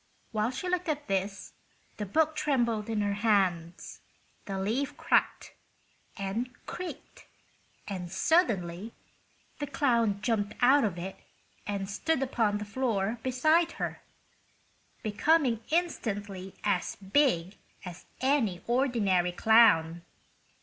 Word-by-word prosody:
While 215 Hz, 0 st, 0 dB
she 265 Hz, +8 st, -5 dB
looked 360 Hz, -1 st, -1 dB
at 295 Hz, -1 st, -2 dB
this 195 Hz, +1 st, -2 dB, 0.4 s
the 210 Hz, -, -4 dB
book 315 Hz, +8 st, +2 dB
trembled 235 Hz, -8 st, 0 dB
in 220 Hz, -2 st, 0 dB
her 205 Hz, 0 st, 0 dB
hands, 190 Hz, -5 st, 0 dB, 0.4 s
the 195 Hz, -1 st, -4 dB
leaf 225 Hz, +9 st, -2 dB
crackled -, -, +1 dB, 0.7 s
and 200 Hz, +6 st, -2 dB, 0.2 s
creaked 365 Hz, -1 st, -8 dB, 0.6 s
and 180 Hz, -3 st, -5 dB
suddenly 200 Hz, -, +1 dB, 0.7 s
the 290 Hz, -, -3 dB
clown 235 Hz, -8 st, +1 dB
jumped 210 Hz, -4 st, 0 dB
out 270 Hz, +3 st, +5 dB
of 195 Hz, -5 st, -1 dB
it 185 Hz, +2 st, -6 dB, 0.5 s
and 200 Hz, -1 st, -2 dB
stood 270 Hz, +8 st, 0 dB
upon 225 Hz, -5 st, +1 dB
the 210 Hz, -, -5 dB
floor 220 Hz, -1 st, -1 dB
beside 310 Hz, +7 st, +2 dB
her, -, -, -4 dB, 1.0 s
becoming 235 Hz, +2 st, +2 dB
instantly 205 Hz, -, -2 dB
as 200 Hz, -4 st, 0 dB
big 195 Hz, -, +1 dB, 0.3 s
as 180 Hz, -1 st, -9 dB
any 245 Hz, -10 st, +1 dB
ordinary 225 Hz, -8 st, +1 dB
clown. 175 Hz, -6 st, +4 dB
215 Hz, 115 wpm, -29 LUFS, 195-265 Hz, 1.0 s, out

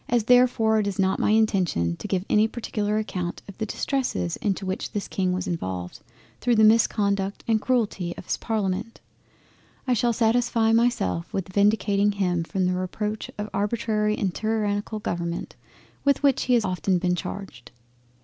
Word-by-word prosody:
—As 240 Hz, -2 st, +2 dB
therefore 235 Hz, -2 st, +4 dB
it 205 Hz, -, 0 dB
is 200 Hz, -, -3 dB
not 190 Hz, 0 st, +1 dB
my -, -, +2 dB
intention 190 Hz, -, +2 dB
to -, -, -6 dB
give 190 Hz, -1 st, -1 dB
any 215 Hz, +1 st, +4 dB
particular 215 Hz, -2 st, -2 dB
account 180 Hz, -5 st, -3 dB
of 200 Hz, -, -10 dB
the 220 Hz, -, -2 dB
distresses 205 Hz, -, -1 dB
into 195 Hz, -1 st, -2 dB
which 190 Hz, +1 st, -4 dB
this 205 Hz, -, -3 dB
King 185 Hz, -2 st, -1 dB
was 180 Hz, 0 st, -2 dB
involved 95 Hz, -, -4 dB, 0.4 s
through 245 Hz, -1 st, +2 dB
the 220 Hz, -, +5 dB
misconduct 200 Hz, -3 st, +2 dB
and 220 Hz, -2 st, +2 dB
Cruelty 210 Hz, -9 st, -1 dB
of -, -, -9 dB
his -, -, 0 dB
Parliament, 215 Hz, 0 st, -2 dB, 0.9 s
I 255 Hz, -, +3 dB
shall 240 Hz, +1 st, +2 dB
satisfy 230 Hz, 0 st, +2 dB
myself 225 Hz, -, +1 dB
with 185 Hz, -1 st, -4 dB
vindicating 205 Hz, 0 st, +3 dB
him 180 Hz, -4 st, 0 dB
from 185 Hz, +2 st, -1 dB
the 180 Hz, -, +1 dB
Reproach 210 Hz, +4 st, -3 dB
of 210 Hz, 0 st, -3 dB
Arbitrary 210 Hz, +1 st, 0 dB
and 190 Hz, -3 st, -1 dB
tyrannical 215 Hz, -1 st, -1 dB
Government 170 Hz, -4 st, -4 dB, 0.5 s
with 280 Hz, 0 st, +2 dB
which 275 Hz, -3 st, +3 dB
he 250 Hz, -, +3 dB
has 230 Hz, -3 st, +2 dB
often 185 Hz, 0 st, 0 dB
been 180 Hz, 0 st, 0 dB
charged. 180 Hz, -, -7 dB
205 Hz, 170 wpm, -25 LUFS, 185-225 Hz, 0.9 s, the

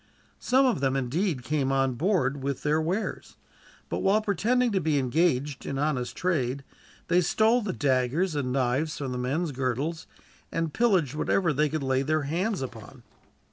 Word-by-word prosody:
Some 265 Hz, +2 st, +3 dB
of 250 Hz, -, +2 dB
them 135 Hz, -1 st, +1 dB
indeed 135 Hz, +3 st, -1 dB
came 140 Hz, -2 st, 0 dB
on 135 Hz, -1 st, +1 dB
board 145 Hz, -, 0 dB
with 140 Hz, -1 st, -3 dB
their 150 Hz, +1 st, +2 dB
wares, 180 Hz, +7 st, -3 dB, 0.5 s
but -, -, -3 dB
while 195 Hz, +2 st, +3 dB
pretending 220 Hz, +5 st, +1 dB
to 190 Hz, -2 st, +1 dB
be 155 Hz, -2 st, +1 dB
engaged 140 Hz, 0 st, 0 dB
in 135 Hz, -, -4 dB
honest 135 Hz, -4 st, -1 dB
trade, 140 Hz, -7 st, -1 dB, 0.4 s
they 175 Hz, +1 st, +4 dB
stole 225 Hz, +7 st, +3 dB
the 205 Hz, -3 st, -2 dB
daggers 145 Hz, +4 st, +1 dB
and 140 Hz, -4 st, -2 dB
knives 135 Hz, +4 st, 0 dB
from 135 Hz, -3 st, -4 dB
the 125 Hz, -, -3 dB
men's 145 Hz, +6 st, -1 dB
girdles, 135 Hz, +5 st, -2 dB, 0.4 s
and 165 Hz, -2 st, -2 dB
pillaged 190 Hz, -, +2 dB
whatever 165 Hz, +2 st, +1 dB
they 150 Hz, +2 st, +1 dB
could 155 Hz, -1 st, -3 dB
lay 130 Hz, 0 st, +1 dB
their 155 Hz, +2 st, 0 dB
hands 175 Hz, +5 st, -1 dB
upon. 120 Hz, 0 st, -10 dB
150 Hz, 170 wpm, -27 LUFS, 135-180 Hz, 0.5 s, they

